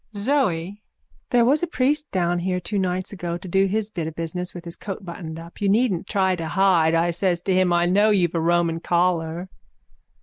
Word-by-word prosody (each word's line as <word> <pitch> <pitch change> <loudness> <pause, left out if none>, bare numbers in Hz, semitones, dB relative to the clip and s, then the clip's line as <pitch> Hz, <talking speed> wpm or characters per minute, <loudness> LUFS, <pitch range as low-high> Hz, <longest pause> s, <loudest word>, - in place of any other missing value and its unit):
ZOE: 205 - 0 0.5
There 240 -1 +4
was 285 +5 +3
a 350 - 0
priest 295 0 0
down 175 -1 0
here 180 +1 -1
two 200 +4 -2
nights 185 +1 -2
ago 175 -3 -4
to 180 - -10
do 195 +2 +2
his 215 +2 -2
bit 170 -6 -3
of 160 - -7
business 175 +2 -4
with 175 -1 -10
his 170 - -6
coat 195 -1 -7
buttoned 165 -2 -7
up. 165 +3 -12
You 200 - +2
needn't 210 -4 +1
try 190 -2 +1
to 165 -1 -4
hide, 175 -4 +3
I 170 +1 +2
says 175 0 0
to 190 - 0
him. 185 -1 +3
I 175 0 +3
know 205 +4 +3
you've 180 -5 +2
a 170 - 0
Roman 170 0 +1
collar. 170 0 0
180 Hz, 210 wpm, -23 LUFS, 170-200 Hz, 0.5 s, There